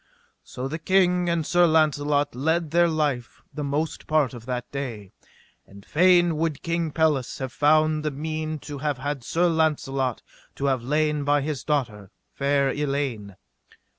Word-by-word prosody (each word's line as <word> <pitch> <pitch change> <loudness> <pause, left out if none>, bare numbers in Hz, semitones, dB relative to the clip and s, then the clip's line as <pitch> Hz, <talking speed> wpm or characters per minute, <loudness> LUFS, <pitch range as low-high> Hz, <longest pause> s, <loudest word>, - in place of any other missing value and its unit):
So 130 +1 -6
the 155 +4 -5
king 180 0 +2
and 170 -2 0
Sir 175 +1 +4
Launcelot 145 -2 +2
led 160 +5 0
their 170 +1 +4
life 150 -7 -2
the 150 - -4
most 145 +3 -3
part 150 -5 +2
of 120 -1 -10
that 125 -1 -4
day. 120 -9 -5 0.6
And 100 0 -15
fain 175 -1 +4
would 160 -2 -2
King 170 -1 -1
Pelles 150 -5 0
have 130 -2 -5
found 155 +1 +3
the 155 - 0
mean 155 +2 -4
to 145 -2 -7
have 145 -1 -1
had 140 -1 -4
Sir 170 +8 +1
Launcelot 140 -6 0 0.3
to 140 - -3
have 135 -3 +1
lain 150 +3 0
by 145 0 +2
his 140 -3 -3
daughter, 115 -10 -2 0.2
fair 140 -1 +1
Elaine. 135 -9 -3
150 Hz, 160 wpm, -24 LUFS, 135-160 Hz, 0.6 s, Sir